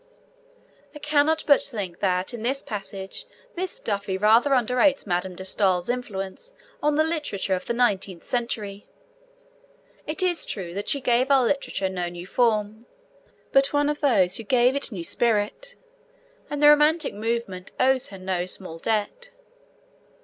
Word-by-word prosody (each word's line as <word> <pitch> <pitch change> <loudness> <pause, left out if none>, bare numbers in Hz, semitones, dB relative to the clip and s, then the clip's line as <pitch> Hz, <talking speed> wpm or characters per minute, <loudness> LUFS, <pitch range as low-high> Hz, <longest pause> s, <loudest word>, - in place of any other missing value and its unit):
I - - -6
cannot 295 +2 +2
but 285 - +5
think 200 -9 -4
that 185 +2 0
in 235 - -6
this 265 +4 0
passage 200 - -7 0.3
Miss 365 +1 -4
Duffy 200 -2 -2
rather 220 +7 +4
underrates 250 +3 +2
Madame 180 -1 -2
de 190 - -8
Stael's 185 0 +1
influence 245 - -6 0.3
on 295 0 +2
the 310 - +4
literature 300 - -2
of 185 0 -2
the - - 0
nineteenth 195 -7 0
century. 215 -5 -3 1.2
It 320 +5 0
is 355 -2 +1
true 180 -4 -5
that 200 +2 -4
she 280 - 0
gave 245 +2 +2
our 270 -3 +5
literature 275 -7 -1
no 180 -2 -3
new 175 0 -8
form, 220 0 0 0.6
but 275 0 +5
she - - -11
was - - -17
one 290 0 +2
of 295 - -2
those 200 -11 +2
who 225 - -6
gave 250 +4 +3
it 280 - 0
a - - -10
new 175 - -4
spirit, 235 - -1 0.7
and 290 0 -3
the 295 - +9
romantic 300 +2 +4
movement 210 -4 -3
owes 260 0 +3
her 195 - -10
no 185 -1 -2
small 180 -3 -7
debt. 225 - -2
230 Hz, 165 wpm, -24 LUFS, 190-280 Hz, 1.2 s, the